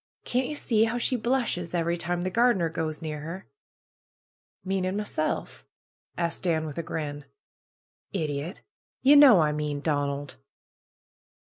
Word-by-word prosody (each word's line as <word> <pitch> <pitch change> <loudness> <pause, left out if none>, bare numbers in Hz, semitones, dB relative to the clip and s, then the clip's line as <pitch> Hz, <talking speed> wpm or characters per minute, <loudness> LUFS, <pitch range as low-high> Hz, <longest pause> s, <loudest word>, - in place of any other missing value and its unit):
Can't 250 +1 0
ye 300 - -4
see 225 -6 +2
how 230 +2 -1
she 255 +2 +1
blushes 235 -8 0
every 170 0 +1
time 175 +1 -2
the 185 - -2
gardener 215 -7 +3
goes 160 -1 -4
near 155 -1 -4
her!" 165 +6 -7 1.2
"Meaning 190 0 -1
myself?" 155 - -3 0.5
asked 170 -1 -2
Dan 160 -3 0
with 150 0 -5
a - - +1
grin. 145 -3 -5 0.9
"Idiot! 155 -1 -3 0.4
Ye 280 +3 +7
know 270 - +8
I 150 -1 +2
mean 150 -1 -2
Donald." 145 -2 -2
170 Hz, 135 wpm, -27 LUFS, 155-210 Hz, 1.2 s, know